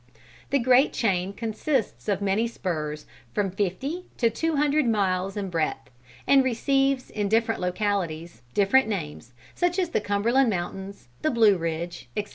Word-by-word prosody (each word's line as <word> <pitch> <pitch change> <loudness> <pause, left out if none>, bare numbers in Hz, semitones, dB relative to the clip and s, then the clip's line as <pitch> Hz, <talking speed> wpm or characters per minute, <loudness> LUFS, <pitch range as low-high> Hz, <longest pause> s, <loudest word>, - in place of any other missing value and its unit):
The 280 - +3
great 255 +2 +4
chain 190 -4 0
consists 225 +3 -2
of 200 0 0
many 200 +4 +1
spurs, 155 -9 -4 0.3
from 195 -2 0
fifty 260 - -3
to 230 -2 +2
two 325 +7 -1
hundred 295 -1 +2
miles 195 -2 0
in 195 -2 -3
breadth, 160 -5 -2 0.3
and 275 -1 +5
receives 270 +2 +1
in 205 -2 -2
different 225 0 +1
localities, 180 - -2
different 215 +6 +4
names, 95 - -5 0.2
such 355 0 0
as 365 -3 +1
the - - +1
Cumberland 230 +6 +2
mountains, 190 - -5
the 310 - +2
Blue 225 -6 +5
Ridge, 165 0 -4
etc. 205 0 -2
205 Hz, 150 wpm, -26 LUFS, 185-260 Hz, 0.3 s, and